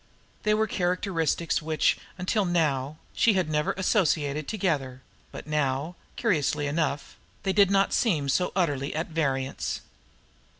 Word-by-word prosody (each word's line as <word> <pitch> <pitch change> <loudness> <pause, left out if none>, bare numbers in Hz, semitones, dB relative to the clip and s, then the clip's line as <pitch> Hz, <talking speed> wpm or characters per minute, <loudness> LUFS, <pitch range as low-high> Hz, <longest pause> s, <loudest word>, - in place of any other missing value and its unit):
They 210 0 +2
were 220 +1 +2
characteristics 175 -4 0
which, 155 0 +2 0.2
until 195 +3 +1
now, 155 -5 0 0.2
she 230 - +4
had 185 -4 +1
never 155 +6 +1
associated 155 -7 +1
together; 145 - -1 0.3
but - - -8
now, 150 +2 -1 0.2
curiously 150 - +1
enough, 145 -1 -2 0.3
they 190 - +1
did 200 0 +5
not 195 0 +3
seem 160 - +1
so 180 +6 +1
utterly 145 -7 0
at 160 +2 -2
variance. 135 -5 -1
160 Hz, 130 wpm, -27 LUFS, 145-190 Hz, 0.3 s, did